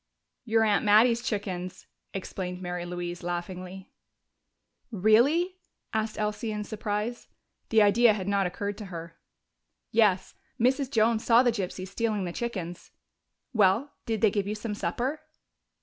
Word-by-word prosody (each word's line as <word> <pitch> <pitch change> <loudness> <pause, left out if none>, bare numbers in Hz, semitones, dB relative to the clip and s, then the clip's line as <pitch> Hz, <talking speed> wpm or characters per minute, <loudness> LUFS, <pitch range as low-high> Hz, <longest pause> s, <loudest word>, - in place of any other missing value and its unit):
"Your 225 -1 +3
aunt 210 -2 +2
Mattie's 230 +3 +5
chickens," 185 -5 -4 0.3
explained 185 -1 -5
Mary 175 -1 -4
Louise 175 0 -5
laughingly. 180 +2 -5 1.0
"Really?" 245 - +3 0.4
asked 220 0 -1
Elsie 215 +1 -2
in 210 0 -3
surprise. 215 +2 -3 0.4
The 220 -2 +5
idea 215 +3 +5
had 190 -2 -4
not 200 -2 +2
occurred 200 +3 -4
to 210 - -6
her. 170 -3 -8 0.7
"Yes. 210 -4 +3 0.3
Mrs. 260 +3 +2
Jones 225 -2 +2
saw 235 +1 +6
the 245 - +3
gypsies 190 -3 -4
stealing 215 -4 -1
the 175 - -4
chickens.... 185 -8 -5 0.6
Well, 220 +6 +3
did 225 -2 -1
they 220 - +5
give 200 -1 -1
you 210 - -2
some 210 0 -4
supper?" 260 +8 -2
210 Hz, 135 wpm, -28 LUFS, 185-230 Hz, 1.0 s, saw